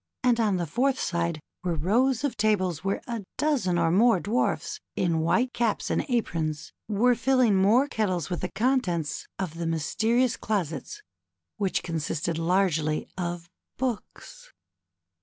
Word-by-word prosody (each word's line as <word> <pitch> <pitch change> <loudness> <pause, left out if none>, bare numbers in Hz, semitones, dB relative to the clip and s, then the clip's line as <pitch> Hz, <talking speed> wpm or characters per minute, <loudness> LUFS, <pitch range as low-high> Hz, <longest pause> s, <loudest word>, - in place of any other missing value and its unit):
and 245 -2 +3
on 210 -4 +2
the 175 - -1
fourth 255 - +1
side 170 -2 -1 0.2
were 175 -2 0
rows 230 - +2
of 275 -5 -1
tables 185 -7 +1
where 195 +1 -1
a 235 -3 -3 0.2
dozeii 235 - +1
or 165 -1 +2
more 225 +2 +5
Dwarfs 220 +7 -1 0.2
in 170 -3 +1
white 235 +11 +1
caps 230 -3 0
and - - 0
aprons 160 - -2
were 225 +4 +3
filling 245 -2 +3
more 215 +9 +4
kettles 190 - -1
with 175 -2 -3
the 180 - -3
contents 195 - 0
of 170 -4 -4
the 170 - -2
mysterious 225 - +1
closets 205 - -3 0.5
which 200 -3 0
consisted 165 0 -2
largely 165 -3 +1
of 175 -1 -4 0.3
books. - - -5
195 Hz, 140 wpm, -27 LUFS, 170-240 Hz, 0.5 s, more